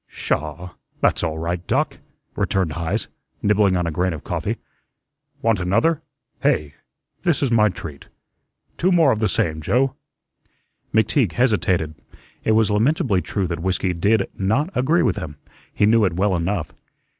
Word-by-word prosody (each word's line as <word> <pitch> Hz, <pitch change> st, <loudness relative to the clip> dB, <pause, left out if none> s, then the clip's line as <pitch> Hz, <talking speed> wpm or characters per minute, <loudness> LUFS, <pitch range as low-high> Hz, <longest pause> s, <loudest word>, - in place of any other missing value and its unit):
"Sha! 80 Hz, +4 st, -3 dB, 0.3 s
That's -, -, +2 dB
all 80 Hz, -2 st, -1 dB
right, 85 Hz, +2 st, -2 dB
Doc," -, -, 0 dB, 0.4 s
returned 95 Hz, -4 st, 0 dB
Heise, 85 Hz, +6 st, -2 dB, 0.4 s
nibbling 100 Hz, -2 st, +3 dB
on 90 Hz, -, 0 dB
a 85 Hz, -, -1 dB
grain 90 Hz, +3 st, 0 dB
of 75 Hz, -, -8 dB
coffee. -, -, -2 dB, 0.9 s
"Want 115 Hz, -4 st, +2 dB
another? 115 Hz, -, +2 dB, 0.4 s
Hey? 75 Hz, -2 st, +1 dB, 0.5 s
This 170 Hz, -4 st, +1 dB
my 105 Hz, -2 st, +5 dB
treat. 75 Hz, -6 st, -8 dB, 0.7 s
Two 185 Hz, +2 st, +3 dB
more 165 Hz, -6 st, +5 dB
of 110 Hz, -, 0 dB
the 110 Hz, -2 st, +1 dB
same, 80 Hz, -3 st, 0 dB
Joe." 130 Hz, -, +1 dB, 1.0 s
McTeague 110 Hz, -, +2 dB
hesitated. 95 Hz, -, +1 dB, 0.5 s
It 110 Hz, -, +2 dB
was 110 Hz, -1 st, +3 dB
lamentably 110 Hz, -, +2 dB
true 100 Hz, +1 st, -2 dB
that 85 Hz, -1 st, -3 dB
whiskey 95 Hz, 0 st, 0 dB
did 100 Hz, +4 st, +2 dB
not 110 Hz, -, 0 dB
agree 150 Hz, +8 st, +3 dB
with 110 Hz, -7 st, +1 dB
him; 75 Hz, -2 st, -5 dB, 0.4 s
he 105 Hz, -, +2 dB
knew 110 Hz, +1 st, +4 dB
it 90 Hz, -, 0 dB
well 95 Hz, +2 st, +1 dB
enough. 85 Hz, 0 st, -2 dB
95 Hz, 150 wpm, -22 LUFS, 85-115 Hz, 1.0 s, my